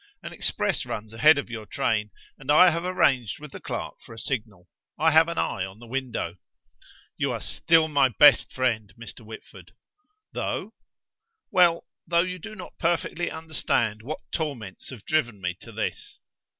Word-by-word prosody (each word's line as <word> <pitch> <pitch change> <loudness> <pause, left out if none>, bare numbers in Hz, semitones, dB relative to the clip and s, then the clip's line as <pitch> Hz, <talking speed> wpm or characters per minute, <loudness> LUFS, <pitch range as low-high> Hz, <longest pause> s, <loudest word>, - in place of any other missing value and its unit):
An - - -7
express - - 0
runs 110 +1 -6
ahead 150 +7 +6
of 140 - -4
your 110 -2 -6
train, 105 0 0 0.3
and 135 -1 -14
I 175 +4 +8
have 165 +1 -2
arranged 130 - +1
with 150 -1 -10
the - - -8
clerk - - -6
for 115 - -12
a - - -15
signal; 110 -7 -4 0.3
I 160 +2 +4
have 160 +1 +6
an 170 - -4
eye 95 - -1
on 95 +1 -7
the 120 - -13
window." 120 -8 -3 0.8
"You - - 0
are - - -3
still 160 -1 +3
my 140 -3 +3
best 145 +4 +6
friend, 115 -5 -1
Mr. 115 0 -8
Whitford." 110 0 -12 0.6
"Though?" - - -3 0.8
"Well, 175 -2 +4 0.2
though 170 0 +3
you 185 0 -5
do 215 +5 -9
not 185 - -11
perfectly 175 0 0
understand 130 -9 -1
what 145 +7 -5
torments 125 - -4
have 125 -6 -10
driven 120 -9 0
me 90 -2 -3
to 115 - -12
this." 110 -1 -4
130 Hz, 170 wpm, -26 LUFS, 110-160 Hz, 0.8 s, I